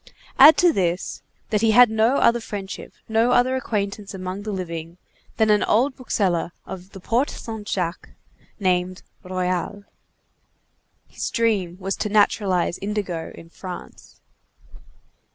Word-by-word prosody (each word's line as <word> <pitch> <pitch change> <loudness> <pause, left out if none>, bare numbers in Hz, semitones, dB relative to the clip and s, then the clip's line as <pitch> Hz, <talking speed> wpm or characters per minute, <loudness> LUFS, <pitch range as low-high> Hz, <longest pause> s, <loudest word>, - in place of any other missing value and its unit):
Add 300 +4 +10
to 350 -2 +5
this, 180 -3 -1 0.3
that 210 -1 +2
he 225 -1 +3
had 245 -1 +7
no 220 +4 +3
other 235 +1 +4
friendship, 200 -4 -7 0.2
no 225 +2 +2
other 255 +1 +3
acquaintance 205 -5 -3
among 185 +1 -5
the 215 +1 -5
living, 170 -3 -5 0.4
than 220 -1 +3
an 210 - +4
old 255 +5 +2
bookseller 185 -9 -1
of 185 +1 -9
the 195 - -9
Porte 235 +9 0
Saint 220 -2 -7
Jacques, 175 -2 -3 0.5
named 185 -1 0 0.2
Royal. 185 +2 -3 1.2
His - - -4
dream 200 -7 0
was 195 +1 -2
to 210 - -2
naturalize 200 -4 +2
indigo 195 -5 -3
in 165 0 -14
France. 180 -1 -10
200 Hz, 135 wpm, -23 LUFS, 180-225 Hz, 1.2 s, Add